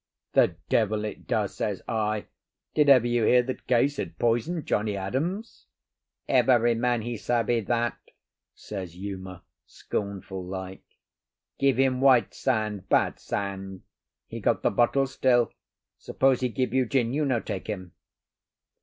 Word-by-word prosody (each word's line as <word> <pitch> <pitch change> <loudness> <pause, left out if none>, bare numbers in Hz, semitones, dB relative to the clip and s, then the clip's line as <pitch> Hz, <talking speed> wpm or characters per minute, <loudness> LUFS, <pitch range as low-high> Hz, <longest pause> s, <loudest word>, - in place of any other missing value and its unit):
"The - - +4
devil 110 -1 +1
it 105 - -7
does!" - - 0
says - - -3
I. 110 -1 -1 0.5
"Did 150 -2 +3
ever 130 -4 +7
you 120 -1 +1
hear 125 +3 +5
that 130 +1 -6
Case 135 +3 +2
had - - -5
poisoned 120 +8 0
Johnnie 105 -1 0
Adams?" 160 - -4 0.6
"Every 120 -2 +4
man 120 0 0
he 120 +1 -3
savvy 120 +1 +1
that," 120 +2 -1 0.6
says 95 -4 -7
Uma, 95 -2 -7 0.2
scornful 95 -2 -5
like. 95 +1 -6 0.8
"Give 135 -3 +3
him 130 -1 +2
white 130 -3 +5
sand—bad 110 -6 0
sand. 95 -1 -5 0.4
He - - -7
got - - 0
the - - +3
bottle 135 +3 +3
still. 125 -2 +2 0.5
Suppose 135 -1 +2
he 125 - 0
give 125 0 -2
you 130 -2 +2
gin, 120 -1 +1
you 150 +2 +1
no 130 -5 +1
take 100 -4 -5
him." 95 -5 -5
115 Hz, 140 wpm, -26 LUFS, 100-130 Hz, 0.8 s, ever